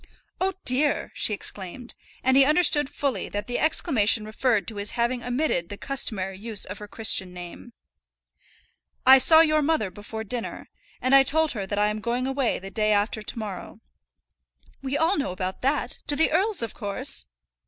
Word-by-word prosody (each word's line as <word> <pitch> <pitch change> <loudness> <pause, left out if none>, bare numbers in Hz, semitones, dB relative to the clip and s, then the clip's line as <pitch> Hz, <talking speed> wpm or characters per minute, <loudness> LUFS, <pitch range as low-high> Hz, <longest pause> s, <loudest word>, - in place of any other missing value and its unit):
"Oh, 380 +1 0
dear!" 280 +4 +2
she - - +1
exclaimed, 205 +3 -6 0.3
and 260 0 +3
he 275 - +7
understood 300 -1 +4
fully 280 -3 -3
that 205 0 -4
the 245 +1 -3
exclamation 230 - +2
referred 215 -3 0
to 220 - -6
his 205 +4 -3
having 240 +1 0
omitted 245 - -1
the 205 - -7
customary 195 -9 -3
use 220 -1 -2
of 200 - -8
her 210 - -9
Christian 200 -4 +2
name. 180 +7 -10 1.3
"I 265 +1 +9
saw 320 +5 +7
your 310 -1 +3
mother 295 - 0
before 210 +3 -7
dinner, 235 +2 -5 0.3
and 255 +1 +2
I 275 - +9
told 310 +3 +1
her 200 -5 -4
that 205 - -3
I 210 0 +2
am 210 0 -4
going 240 +3 -1
away 270 -2 0
the 195 +1 -9
day 215 +2 0
after 210 +2 0
to 215 - -4
morrow." 205 -5 -7 1.0
"We 275 +1 -2
all 325 +3 +1
know 275 - -2
about 185 0 -5
that; 275 +2 -1
to 290 - +1
the 320 +3 +2
earl's, 380 - +1
of 225 - -4
course!" 220 +6 -6
240 Hz, 180 wpm, -25 LUFS, 205-280 Hz, 1.3 s, I